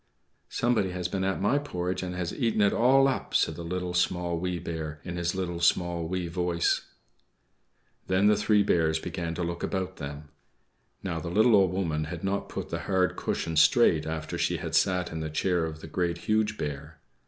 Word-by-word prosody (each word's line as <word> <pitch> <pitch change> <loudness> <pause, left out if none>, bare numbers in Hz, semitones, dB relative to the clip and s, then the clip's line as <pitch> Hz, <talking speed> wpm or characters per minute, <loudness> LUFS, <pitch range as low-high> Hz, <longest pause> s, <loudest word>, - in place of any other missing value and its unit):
"=Somebody 115 -6 +1
has 90 -1 -3
been 95 +1 -2
at 95 0 0
my 115 +9 +2
porridge 90 -10 -3
and 90 -1 -4
has 90 -2 -3
eaten 115 -5 0
it 100 - +4
all 135 +3 +5
up!=" 135 - -2
said 80 - +3
the 85 - -8
Little, 90 +1 -3
Small, 90 -1 0
Wee 90 0 -2
Bear, 80 -3 -5
in 90 -1 -5
his 85 +1 -1
little, 90 -2 -3
small, 85 -1 +1
wee 90 0 -2
voice. 85 0 0 1.2
Then 95 +2 +2
the 105 0 +6
three 105 0 +3
Bears 80 -5 +2
began 85 +1 -4
to 90 - -2
look 85 0 -3
about 95 -1 -3
them. 75 +1 -7 0.7
Now, 85 -4 -2
the 85 - -5
little 110 +5 +5
Old 95 -3 +4
Woman 80 -5 -1
had 80 +2 -7
not 100 +1 -2
put - - -5
the - - -3
hard 95 -1 +2
cushion 80 - -2
straight 80 -2 +4
after 80 -1 -4
she - - +1
had - - -6
sat 90 -2 +2
in 80 - -4
the 80 0 -3
chair 85 +2 0
of 80 0 -7
the - - -8
Great, 85 +1 -1
Huge 110 +3 0
Bear. 75 +1 -5
90 Hz, 200 wpm, -28 LUFS, 80-95 Hz, 1.2 s, the